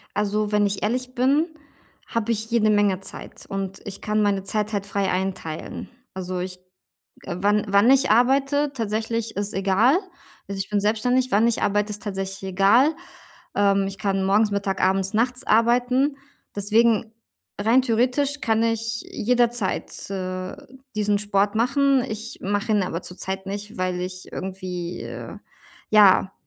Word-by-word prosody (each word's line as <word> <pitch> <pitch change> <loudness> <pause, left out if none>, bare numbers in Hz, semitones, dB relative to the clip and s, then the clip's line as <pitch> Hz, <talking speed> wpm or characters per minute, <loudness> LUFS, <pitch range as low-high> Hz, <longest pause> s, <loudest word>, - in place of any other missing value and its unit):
Also, 210 0 0
wenn 210 0 +3
ich 200 -1 -2
ehrlich 255 +3 -2
bin, 275 +6 +3 0.6
habe 230 0 -1
ich 220 0 -2
jede 225 -2 +3
Menge 205 -3 +3
Zeit - - -9
und 195 -1 -4
ich 200 - -8
kann 215 0 0
meine 200 -2 +1
Zeit 210 +1 -2
halt 200 -1 -1
frei 200 -1 -1
einteilen, 180 -4 -4 0.2
also, 185 -1 -4
ich 180 0 -5 0.6
äh, 175 - -5
wann 205 +2 +2
wann 200 +5 +5
ich 270 0 +4
arbeite 275 +5 +3
tatsächlich, 225 -1 -2
ist 205 +1 -2
egal. 195 - +3 0.5
Also, 200 -1 -5
ich 195 - -3
bin 205 -1 +1
selbstständig, 245 +5 +1
wann 210 +3 +4
ich 235 - -1
arbeite, 205 +1 +1
ist 210 0 -5
tatsächlich 195 -1 -4
egal, 215 - +4 0.6
ähm, 200 -1 +3
ich 195 0 -5
kann 195 -2 0
morgens, 205 +2 +3
Mittag, 200 -1 -2
abends, 190 +1 +1
nachts 250 +4 0
arbeiten, 250 +5 +3 0.4
deswegen 220 +2 +2 0.5
rein 225 +5 +4
theoretisch 255 +4 +1
kann 225 0 +2
ich 225 0 -1
jederzeit, 240 -5 0
äh, 185 -1 -4 0.4
diesen 210 -1 +1
Sport 200 0 +1
machen. 270 +3 +2
Ich 225 +1 -6
mache 205 +3 -1
ihn 210 -2 +3
aber 175 -2 -3
zurzeit 190 +1 -5
nicht, 205 +2 -6
weil 185 -1 -1
ich 185 0 -6
irgendwie, 185 -2 -5
äh, - - -8 0.5
ja, 195 -2 +6
210 Hz, 150 wpm, -23 LUFS, 195-230 Hz, 0.6 s, ja